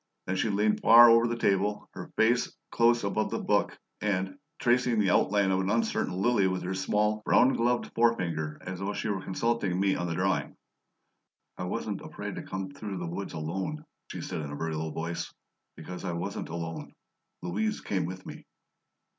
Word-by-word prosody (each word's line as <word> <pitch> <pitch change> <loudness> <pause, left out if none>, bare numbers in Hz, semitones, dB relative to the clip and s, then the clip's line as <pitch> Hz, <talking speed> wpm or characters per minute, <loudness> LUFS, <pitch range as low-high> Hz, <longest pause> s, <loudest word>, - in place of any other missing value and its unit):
Then 95 - -1
she 110 - 0
leaned 105 +1 +1
far 120 +1 +9
over 115 +1 +5
the 120 0 -2
table, 105 -1 +1
her - - -9
face 115 +2 +3 0.2
close 120 0 +3
above 100 +2 0
the - - -2
book, - - +1 0.2
and, 95 +2 -1 0.2
tracing 125 -1 +2
the 100 -4 +3
outline 100 -1 +3
of 95 - +2
an 95 0 -1
uncertain 115 -4 0
lily 100 -2 +3
with 95 0 -2
her 90 +1 -2
small, 105 +3 +1
brown 130 +4 +5
gloved 120 +1 0
forefinger, 85 -10 +1
as 90 0 -5
though 100 +2 -2
she - - -3
were 95 -2 -1
consulting 95 -1 -1
me 95 0 +3
on 85 - -2
the 80 - -2
drawing, 95 +2 -1 1.0
"I - - -5
wasn't - - -3
afraid - - -6
to - - -3
come 95 0 -5
through 100 -1 -6
the 90 - -4
woods 100 +3 -5
alone," 95 - -4 0.2
she - - -6
said, - - -4
in 70 -1 -6
a - - -5
very 80 +2 -3
low 80 +1 -2
voice, 85 +2 -4 0.4
"because 90 +3 -8
I 90 -3 -2
wasn't 85 - -4
alone. 80 0 -5 0.5
Louise 105 +5 -1
came 95 -2 -1
with 95 +1 -7
me." - - -10
95 Hz, 190 wpm, -29 LUFS, 90-110 Hz, 1.0 s, far